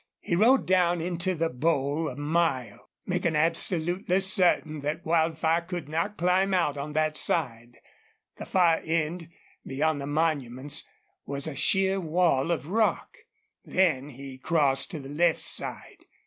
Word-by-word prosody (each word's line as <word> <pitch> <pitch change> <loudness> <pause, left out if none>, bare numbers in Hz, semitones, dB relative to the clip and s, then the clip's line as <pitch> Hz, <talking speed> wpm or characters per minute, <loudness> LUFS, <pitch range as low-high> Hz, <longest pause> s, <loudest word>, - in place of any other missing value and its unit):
He 170 - -2
rode 240 +8 +4
down 175 -2 +2
into 175 +2 -1
the 165 0 0
bowl 145 +2 0
a - - -8
mile, 145 -4 -1 0.2
making 165 -2 -1
absolutely 175 +3 0
certain 180 -5 +2
that 150 +4 -4
Wildfire 160 0 +1
could 175 -2 -6
not 165 +7 -2
climb 185 +2 +2
out 170 -5 +1
on 145 +1 -5
that 155 0 0
side. 120 -8 -1 0.6
The - - -7
far 175 -3 +3
end, 165 +1 -2 0.3
beyond 145 +2 -1
the 140 - -5
monuments, 145 -2 0 0.4
was 140 0 -2
a 155 - -4
sheer 190 +7 +1
wall 165 -4 +1
of 170 -4 -1
rock. 215 +6 0 0.5
Then 155 -7 +1
he 135 -1 -10
crossed 145 -3 +2
to 170 -5 -6
the 135 - -9
left 165 +4 +1
side. - - -4
160 Hz, 145 wpm, -27 LUFS, 145-175 Hz, 0.6 s, rode